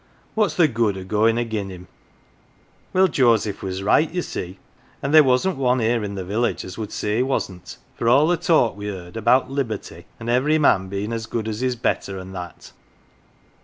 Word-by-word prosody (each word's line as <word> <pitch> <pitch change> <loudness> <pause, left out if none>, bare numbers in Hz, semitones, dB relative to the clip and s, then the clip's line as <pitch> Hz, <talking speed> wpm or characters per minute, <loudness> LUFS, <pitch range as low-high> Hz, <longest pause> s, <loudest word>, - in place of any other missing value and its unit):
What's 215 -3 +1
the 170 -3 +5
good 115 -6 0
o' 95 - -6
goin' 110 +4 +2
agin 110 -4 -2
him? 90 -1 -10 0.5
' - - -35
"Well, 190 +1 +4
Joseph 115 - +2
was 95 0 -4
right, 150 +10 +3
ye 180 +1 -1
see, 90 +2 -6 0.4
and 140 +2 -3
there 155 -1 +9
wasn't 135 +6 +1
one 130 -1 +2
here 115 -1 +1
in 100 -1 -4
the 95 -2 -5
village 110 +6 -1
as 95 - -8
would 110 -2 -6
say 105 +1 -2
he - - +2
wasn't, 95 -9 -3 0.2
for 115 - -1
all 140 +5 +5
the 175 - +3
talk 160 - +2
we 105 0 -6
heard 90 -2 -7
about 120 +4 +2
Liberty, 130 -7 -4
and 115 - -8
every 130 +6 +2
man 95 -11 +3
being 100 +4 -4
as 115 -1 -4
good 110 -1 -3
as 110 -1 -3
his 130 -1 0
better, 100 -4 -2
and 95 0 -9
that. 90 -2 -9
115 Hz, 200 wpm, -22 LUFS, 100-130 Hz, 0.5 s, there